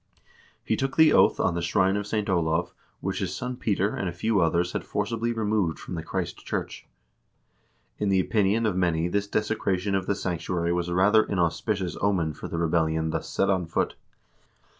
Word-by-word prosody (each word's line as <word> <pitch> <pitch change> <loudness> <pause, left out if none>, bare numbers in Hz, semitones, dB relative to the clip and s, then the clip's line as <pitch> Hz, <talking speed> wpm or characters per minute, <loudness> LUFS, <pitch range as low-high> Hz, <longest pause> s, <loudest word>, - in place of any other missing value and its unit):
He - - 0
took 135 0 -2
the 160 -1 +7
oath - - +5
on - - +2
the 85 - -2
shrine 95 +3 +2
of 105 0 -2
St. 105 -1 -1
Olav, 85 -3 0 0.3
which 95 0 -2
his 95 -2 -2
son 125 0 -4
Peter 100 -4 0
and 95 - -2
a - - -4
few 100 +3 +1
others 85 +2 +1
had - - -3
forcibly 115 +3 -2
removed 105 -7 0
from - - -8
the 85 - -3
Christ 80 - -4
church. - - -4 1.1
In 105 - 0
the 95 -1 +3
opinion 105 +3 +2
of 105 -4 +1
many 85 -2 +1
this 100 +2 -1
desecration 100 -2 -1
of 95 -1 0
the 100 - +1
sanctuary 85 -2 -2
was 90 0 -1
a 85 - -1
rather 105 +4 +5
inauspicious 90 +1 -1
omen 90 -6 +1
for - - -8
the - - -4
rebellion 80 -1 +1
thus 80 - -3
set - - +1
on 90 -3 0
foot. - - -1
95 Hz, 190 wpm, -26 LUFS, 85-105 Hz, 1.1 s, the